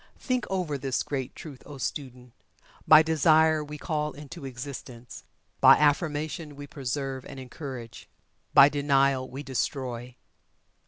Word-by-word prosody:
Think 255 -2 -2
over 175 -7 -2
this 130 -1 -1
great 135 -3 -4
truth, 145 -5 -10
O 145 - -10
student! 125 -3 -6 0.5
By 155 0 +9
Desire 160 0 +3
we 150 0 -8
call 150 -1 -2
into 150 +1 -10
existence 125 -2 -8 0.3
by - - +8
affirmation 150 0 0
we 145 0 -8
preserve 135 -1 -4
and 135 -1 -9
encourage 130 -3 -9 0.4
by 140 - +8
Denial 140 -2 +1
we 135 +3 -7
destroy. 125 -2 -3
140 Hz, 125 wpm, -27 LUFS, 130-150 Hz, 0.5 s, By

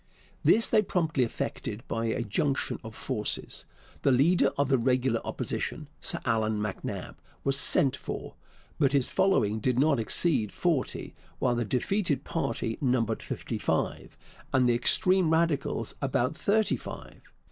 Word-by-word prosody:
This 225 - +4
they 215 - +4
promptly 160 -9 0
effected 115 -1 -4
by 115 0 -2
a 115 +1 -1
junction 130 +6 -1
of 110 -1 -9
forces. 110 -6 -2 0.3
The 140 - +3
leader 150 +8 +4
of 140 -1 +2
the 135 -2 +3
regular 125 -1 +1
Opposition, 150 -2 -4
Sir 175 - 0
Allan 110 -3 +1
MacNab, 105 -2 -5 0.3
was 135 0 +2
'sent 135 0 +4
for.' - - -6 0.5
But 140 -2 +3
his 135 -3 +2
following 110 - +2
did 125 +2 0
not 140 -1 +3
exceed 110 - +1
forty, 165 -7 -1 0.2
while 125 - +1
the 120 -1 -1
defeated 145 - 0
party 115 -7 -2
numbered 120 -5 +1
fifty - - -5
five, - - -2 0.3
and 130 -1 +3
the 120 - +4
extreme 180 +9 +3
Radicals 160 -3 0
about 135 0 0
thirty 210 +5 +1
five. - - -10
130 Hz, 145 wpm, -28 LUFS, 115-160 Hz, 0.5 s, This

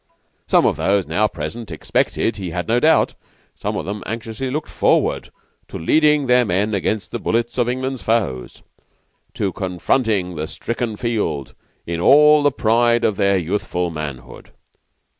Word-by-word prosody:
Some - - +4
of - - +1
those 100 -1 +1
now 95 +8 +1
present 95 +6 -6
expected, 100 +6 -1
he 95 -3 -5
had 90 +1 -4
no 115 +2 +2
doubt 160 +5 +3 0.4
some - - -4
of - - -4
them 100 +3 -5
anxiously 115 +3 -4
looked 150 +4 -4
forward - - +1 0.4
to - - -7
leading 150 - +3
their 125 -1 +4
men 105 +1 0
against 100 +2 -2
the 120 - -3
bullets 120 +2 -1
of 120 0 +2
England's 130 0 -3
foes; 105 - -2 0.7
to 95 -3 -1
confronting 95 +1 -1
the 75 +1 -3
stricken 115 +3 -4
field 100 - -2 0.3
in 85 0 -3
all 150 - +6
the 145 0 +3
pride 120 -1 +2
of 110 - +2
their 100 -1 +2
youthful 90 -1 -2
manhood. 70 -6 -7
110 Hz, 155 wpm, -20 LUFS, 90-120 Hz, 0.7 s, all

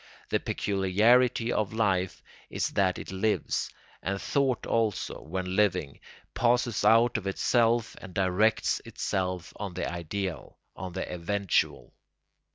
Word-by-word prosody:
The - - +2
peculiarity 115 +5 +2
of 110 -1 -1
life 95 -5 0 0.3
is - - -1
that 95 -2 +1
it - - -7
lives; 105 +3 0 0.3
and 100 +1 -2
thought 135 -1 0
also, 110 -3 -1
when 90 +3 -4
living, 90 -9 +1 0.3
passes 120 -2 +1
out 115 +3 +5
of 100 - -7
itself 115 +3 +2
and 95 - -9
directs 95 +4 +2
itself 90 -3 -3
on 100 -4 -5
the 90 - -2
ideal, 85 0 -4 0.2
on 90 -1 -6
the 95 - -3
eventual. 95 +3 -1
100 Hz, 125 wpm, -28 LUFS, 95-115 Hz, 0.3 s, out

